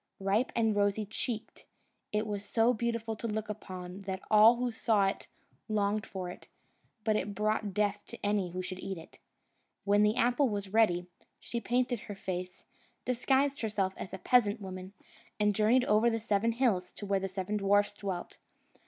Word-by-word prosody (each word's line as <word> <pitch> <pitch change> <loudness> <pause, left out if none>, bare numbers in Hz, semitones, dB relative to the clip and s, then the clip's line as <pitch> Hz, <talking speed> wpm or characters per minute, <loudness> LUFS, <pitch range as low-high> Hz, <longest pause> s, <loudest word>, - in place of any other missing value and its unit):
Ripe 195 +6 +1
and 225 -2 +2
rosy 205 +1 +1
cheeked, 220 +2 -5 0.5
it 210 +1 0
was 205 -2 -3
so 225 +3 +3
beautiful 230 -1 -2
to 230 - -4
look 215 0 -3
upon, 185 -2 -7
that 190 -1 -2
all 215 +2 +8
who 245 0 -1
saw 220 -3 +2
it 195 - -2 0.4
longed 210 0 0
for 185 -2 -5
it; - - -13 0.6
but 215 -1 +2
it 205 -1 -2
brought 210 -1 0
death 205 -1 +1
to - - -8
any 205 -3 +1
who 185 +1 -4
should 185 0 -6
eat 190 -1 -4
it. 165 - -13 0.6
When 205 +1 +4
the 210 +1 +4
apple 245 +3 +3
was 200 -2 -4
ready, 180 -6 +3 0.3
she 235 - -4
painted 245 +1 0
her 205 - -8
face, 185 -2 -5 0.4
disguised 270 +3 +1
herself 205 -4 0
as - - -7
a 190 - -5
peasant 215 +1 +3
woman, 185 -1 -7 0.5
and 210 0 +3
journeyed 225 +5 +3
over 215 +2 +4
the 225 -1 -1
seven 220 +1 +1
hills 225 -7 +1
to 205 - -7
where 195 -1 +1
the 195 0 -3
seven 190 +2 -2
dwarfs 205 +1 +3
dwelt. 195 -4 -5
210 Hz, 180 wpm, -31 LUFS, 195-225 Hz, 0.6 s, all